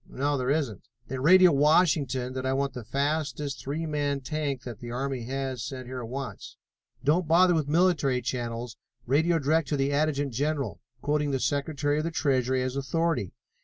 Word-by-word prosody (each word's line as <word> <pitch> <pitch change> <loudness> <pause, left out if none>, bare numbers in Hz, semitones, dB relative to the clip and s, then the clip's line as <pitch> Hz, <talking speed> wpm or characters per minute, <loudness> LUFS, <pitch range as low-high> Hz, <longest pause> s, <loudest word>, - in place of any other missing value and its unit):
"No, 145 +2 -1
there 130 -1 -1
isn't." 135 - -1 0.2
"Then 130 0 -4
radio 180 +4 +7
Washington 140 -4 +2
that 130 0 -4
I 130 0 0
want 135 -1 -1
the 125 -2 -6
fastest 140 +2 -2
three 150 +4 -3
man 145 -2 -1
tank 140 -2 -3
that 120 -3 -7
the 120 - -8
army 130 0 -3
has 130 -1 -3
sent 130 +1 -6
here 130 0 -6
at 115 - -6
once. 135 +2 -7 0.5
Don't 155 +5 +2
bother 175 +3 +5
with 155 -4 0
military 150 -6 +2
channels, 120 -1 -4 0.3
radio 160 +7 +3
direct 155 +1 +1
to 145 - -1
the 135 +1 +1
Adjutant 145 -2 0
General, 140 - -1 0.2
quoting 150 0 +1
the 135 -1 0
Secretary 145 +3 0
of - - -1
the 165 - -1
Treasury 130 -5 +1
as 130 0 -3
authority. 140 - -1
140 Hz, 180 wpm, -27 LUFS, 130-155 Hz, 0.5 s, radio